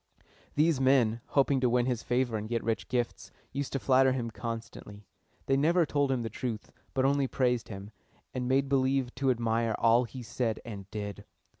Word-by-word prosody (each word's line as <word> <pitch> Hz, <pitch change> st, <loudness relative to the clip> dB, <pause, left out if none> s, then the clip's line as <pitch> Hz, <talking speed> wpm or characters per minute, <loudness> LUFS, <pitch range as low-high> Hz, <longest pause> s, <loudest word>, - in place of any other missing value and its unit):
These 150 Hz, -2 st, +3 dB
men, 125 Hz, -4 st, +3 dB
hoping 140 Hz, -1 st, +2 dB
to 125 Hz, -1 st, +2 dB
win 120 Hz, 0 st, +2 dB
his 125 Hz, -3 st, -1 dB
favor 120 Hz, -1 st, 0 dB
and 110 Hz, 0 st, -4 dB
get 120 Hz, -1 st, -1 dB
rich 115 Hz, -1 st, -1 dB
gifts, 120 Hz, -2 st, -2 dB, 0.2 s
used 140 Hz, +1 st, -3 dB
to 135 Hz, -, 0 dB
flatter 130 Hz, 0 st, +4 dB
him 120 Hz, -3 st, -3 dB
constantly. 115 Hz, -3 st, -7 dB, 0.4 s
They 135 Hz, -, +2 dB
never 165 Hz, +5 st, +3 dB
told 145 Hz, -2 st, +1 dB
him 125 Hz, -3 st, 0 dB
the -, -, -2 dB
truth, 115 Hz, -1 st, -5 dB, 0.2 s
but 130 Hz, 0 st, +2 dB
only 140 Hz, 0 st, +2 dB
praised 125 Hz, -3 st, 0 dB
him, 100 Hz, 0 st, -8 dB, 0.4 s
and 125 Hz, -1 st, -2 dB
made 135 Hz, +2 st, +2 dB
believe 135 Hz, -1 st, +1 dB
to 135 Hz, +1 st, 0 dB
admire 115 Hz, -2 st, +1 dB
all 115 Hz, +2 st, +4 dB
he 125 Hz, +2 st, -8 dB
said 115 Hz, -1 st, -2 dB
and 100 Hz, -4 st, -8 dB
did. 100 Hz, -1 st, -5 dB
125 Hz, 185 wpm, -30 LUFS, 115-135 Hz, 0.4 s, flatter